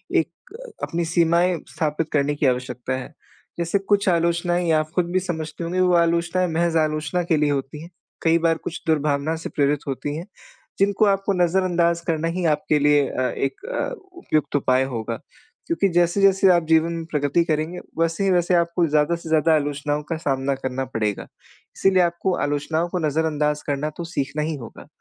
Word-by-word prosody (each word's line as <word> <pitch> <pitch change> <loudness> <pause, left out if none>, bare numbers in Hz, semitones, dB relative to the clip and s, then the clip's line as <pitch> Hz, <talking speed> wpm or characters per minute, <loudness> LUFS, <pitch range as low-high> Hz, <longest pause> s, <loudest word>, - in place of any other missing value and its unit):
एक - - -2 0.3
अपनी 170 0 -1
सीमाएँ 170 +1 +2
स्थापित 155 0 -2
करने 145 0 +1
की 145 - -1
आवश्यकता 125 0 -1
है। 130 +4 -8 0.5
जैसे 170 +4 +1
कुछ 200 +1 +1
आलोचनाएँ 170 +1 +1
या 160 -1 +4
आप 155 0 -3
खुद 180 - +2
भी 185 - +2
समझते 165 -3 -5
होंगे 175 +2 -2
वो 180 -1 +3
आलोचनाएँ 170 +2 +2
महज़ 170 0 +1
आलोचना 155 +2 0
के 165 -2 +1
लिए 150 -1 +2
होती 140 +1 -3
हैं। 170 - -11 0.3
कई 165 0 +4
बार 165 -1 +2
कुछ 165 - -5
दुर्भावना 150 0 +1
से 165 - -6
प्रेरित 145 0 +1
होती 145 +2 -3
हैं 165 +3 -6 0.5
जिनको 200 +2 +3
आपको 195 0 +1
नज़रअंदाज़ 175 -1 +1
करना 165 0 0
ही 175 +1 -2
आपके 150 -1 +2
लिए 145 -1 +4
अ, - - -3 0.2
एक 135 - -3 0.5
उपयुक्त 155 - -1
उपाय 130 -2 +3
होगा। 115 -3 -4 0.5
क्योंकि 335 -12 +1
जैसे-जैसे 190 +3 +3
आप 170 -1 +2
जीवन 160 +1 +3
में 165 -1 -5
प्रगति 145 +3 +1
करेंगे 160 +2 -1 0.2
वैसे 165 +3 +1
ही 195 - +2
वैसे 175 0 +2
आपको 170 0 +2
ज़्यादा 150 +2 +2
से 170 -1 -9
ज़्यादा 160 +1 +3
आलोचनाओं 145 0 -1
का 165 - -1
सामना 135 -2 -1
करना 130 0 -3
पड़ेगा। 110 -5 -2 0.5
इसीलिए 190 -1 +4
आपको 175 +2 0
आलोचनाओं 150 +3 -1
को 180 - -2
नज़रअंदाज़ 150 -1 0
करना 145 +1 -1
तो 170 - -4
सीखना 140 +2 -2
ही 155 0 -2
होगा। 120 +1 -11
160 Hz, 180 wpm, -22 LUFS, 145-175 Hz, 0.5 s, या